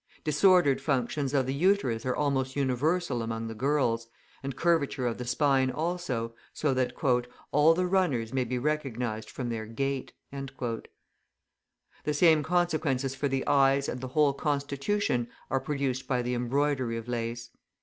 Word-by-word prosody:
Disordered 155 -2 +4
functions 135 0 0
of 135 -2 +2
the 130 - -2
uterus 140 - +1
are 125 - +1
almost 135 -2 0
universal 140 +2 0
among 115 0 -3
the 115 - -5
girls, 120 -2 0 0.3
and 135 -1 -5
curvature 155 -6 +1
of 120 -1 -1
the 125 - -4
spine 130 +1 +2
also, 150 -8 -2 0.2
so 150 -3 0
that 130 -1 0 0.6
"all 150 +3 +5
the 180 +1 +1
runners 165 -12 +1
may 130 -1 +1
be 125 +1 -2
recognised 125 -6 -2
from 125 -2 -4
their 110 -2 -4
gait." 135 +3 -2 0.2
The 135 -4 -4 1.4
same 160 0 +5
consequences 155 -6 0
for 140 +1 -1
the 135 -1 -1
eyes 140 0 +3
and 125 - -4
the 130 - -4
whole 145 +2 +3
constitution 140 - -1 0.2
are 135 - +2
produced 135 -3 -2
by 125 -3 0
the 125 +1 -1
embroidery 130 0 0
of 115 +1 -7
lace. 115 0 -4
135 Hz, 150 wpm, -29 LUFS, 125-150 Hz, 1.4 s, all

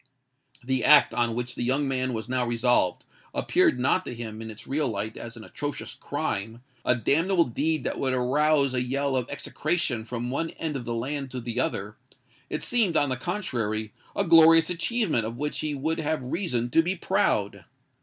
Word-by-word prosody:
The 130 0 0
act 150 -1 +6
on 120 -1 0
which 120 0 -3
the - - -6
young 135 +4 +1
man 130 -1 0
was 110 +1 -5
now 130 0 +1
resolved, 120 -5 +2 0.3
appeared 125 - +2
not 140 +8 +2
to 120 - -6
him 110 -2 -7
in 115 - -7
its 110 0 -9
real 145 +2 0
light 110 -1 -3
as 115 0 -8
an 110 - -10
atrocious 145 +5 -5
crime—a 120 +5 -3
damnable 165 - +3
deed 155 +4 -1
that - - -3
would 130 - +1
arouse 140 +2 +2
a 125 - 0
yell 135 +2 -1
of 125 -2 -1
execration 145 -4 -2
from 120 +1 -4
one 165 +5 -1
end 160 -3 -3
of 125 -3 -4
the 120 - -3
land 135 +4 -3
to 125 0 -5
the 120 0 -4
other:—it 105 -4 -5
seemed, 215 -9 +1
on 145 -1 +2
the 130 - 0
contrary, 120 - -3 0.2
a - - +1
glorious 165 0 +7
achievement 180 - 0
of 115 +2 -5
which 150 +3 -3
he 150 -1 -2
would 160 +4 -2
have 155 -3 -1
reason 125 - -2
to 165 - +5
be 180 +3 -1
proud. - - 0
130 Hz, 185 wpm, -26 LUFS, 120-155 Hz, 0.3 s, glorious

